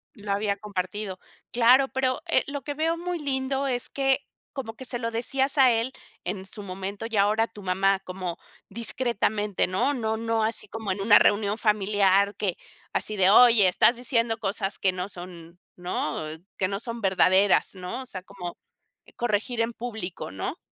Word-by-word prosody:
Lo 205 -2 -6
había 200 0 0
compartido. 195 -1 -4 0.3
Claro, 250 +3 +5
pero, 260 -1 -1
eh, - - +3
lo 280 -2 -5
que 290 - -4
veo 325 +3 0
muy 350 0 -3
lindo 270 -1 -1
es 245 -2 -2
que, 270 0 +1 0.3
como 235 -5 -6
que 260 - -9
se 245 - -2
lo 230 -1 -2
decías 265 +5 -1
a 260 -2 +7
él 230 +3 0 0.3
en 190 +1 -4
su 205 +1 -9
momento, 195 +3 -6
y 225 - -4
ahora 215 +3 +3
tu 210 - -13
mamá, 190 +1 +2
como 185 -2 -5 0.3
discretamente, 215 -3 0
¿no? 190 +10 +1
No 220 -3 -1
no 225 -1 0
así 225 +1 -1
como 220 -3 -4
en 190 - -3
una 205 0 +7
reunión 205 +1 +2
familiar 200 -2 +2
que, 195 -5 -1 0.3
así 215 - -2
de: 190 -1 +4
"Oye, 230 -3 +7
estás 230 +6 +4
diciendo 235 -2 0
cosas 195 -1 -2
que 190 - +2
no 180 +1 -4
son, 175 -2 -11 0.2
¿no?, 175 -3 -3 0.4
que 185 - +1
no 195 +1 -3
son 230 0 -5
verdaderas", 190 +1 +3
¿no? 185 +8 -5
O - - -9
sea, 185 -7 -5
como 185 -3 -8 0.6
corregir 230 +1 -1
en 230 +1 -1
público, 220 - -5
¿no? 95 0 -4
210 Hz, 175 wpm, -26 LUFS, 190-240 Hz, 0.6 s, a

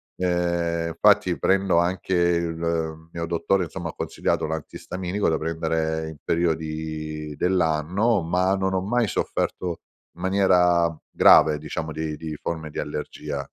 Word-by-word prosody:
ehm, 85 -2 0
infatti 85 - +3
prendo 95 -2 +3
anche 90 +2 -1
il 85 -2 0
mio 85 0 -4
dottore, 90 +3 +1
insomma, 85 0 -5
ha - - -7
consigliato - - -1
l'antistaminico 90 +5 -3
da 80 - +1
prendere 80 0 -1
in 80 - -10
periodi 80 -2 -2
dell'anno, 90 +5 +1
ma 90 +3 +1
non 95 0 -1
ho 95 - +1
mai 115 +3 +1
sofferto 90 -2 -2 0.4
in 85 - -13
maniera 90 -3 +3
grave, 75 -1 +6
diciamo, 80 +1 -5
di 80 -1 -3
di 80 0 -6
forme 80 0 -4
di - - -10
allergia, 75 -1 -4
85 Hz, 135 wpm, -24 LUFS, 80-90 Hz, 0.4 s, grave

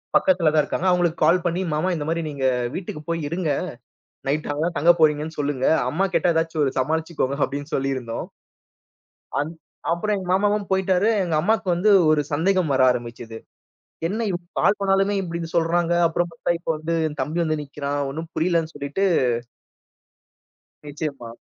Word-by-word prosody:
பக்கத்துல 175 -4 +4
தான் 155 -1 +4
இருக்காங்க. 185 - -2
அவுங்களுக்கு 175 -2 +1
கால் 170 +3 +4
பண்ணி, 175 +1 0
"மாமா 155 +5 0
இந்தமாரி 165 +2 -2
நீங்க 140 -2 -5 0.3
வீட்டுக்கு 175 -4 -5
போயி 165 0 -1
இருங்க. 170 -1 -1 0.8
நைட் 150 +3 -1
அங்கதான் 165 +4 -2
தங்க 165 +4 +5
போறீங்கன்னு 155 0 +2
சொல்லுங்க. 140 -3 0 0.2
அம்மா 180 +8 0
கேட்டா 175 - +3
ஏதாச்சு 165 0 -1
ஒரு 135 - 0
சமாளித்துக்கோங்க." 155 0 -1
அப்பிடின்னு 145 +2 -5
சொல்லியிருந்தோம். 135 -2 -3 1.1
அந் 150 +3 -3 0.4
அப்புறம் 210 +5 0
எங்க 185 -2 -6
மாமாவும் 205 +1 +1
போயிட்டாரு. 190 +1 +2 0.2
எங்க 170 -3 -2
அம்மாவுக்கு 210 +1 +1
வந்து 185 +5 +2 0.2
ஒரு 155 -1 +3
சந்தேகம் 175 +2 +1
வர 130 - +3
ஆரம்பிச்சது. 120 -2 -5 0.7
என்ன 220 +5 -2
இப் 175 -2 -2 0.2
கால் 205 - +3
பண்ணாலுமே 195 +1 +2
இப்பிடீன்னு 170 -2 -5
சொல்றாங்க. 170 +1 +2 0.2
அப்புறம் 175 +2 -1
பார்த்தா 165 - -3
இப்போ 170 - -4
வந்து 160 +2 -2
என் 150 -1 -7
தம்பி 155 +3 -3
வந்து 155 -1 -1
நிற்கிறான். 145 0 -4
ஒன்னும் 160 +3 -6
புரியலன்னு 165 -1 0
சொல்லிட்டு 145 +7 -2 1.8
நிச்சயமா. 140 -5 -5
165 Hz, 150 wpm, -23 LUFS, 145-180 Hz, 1.8 s, தங்க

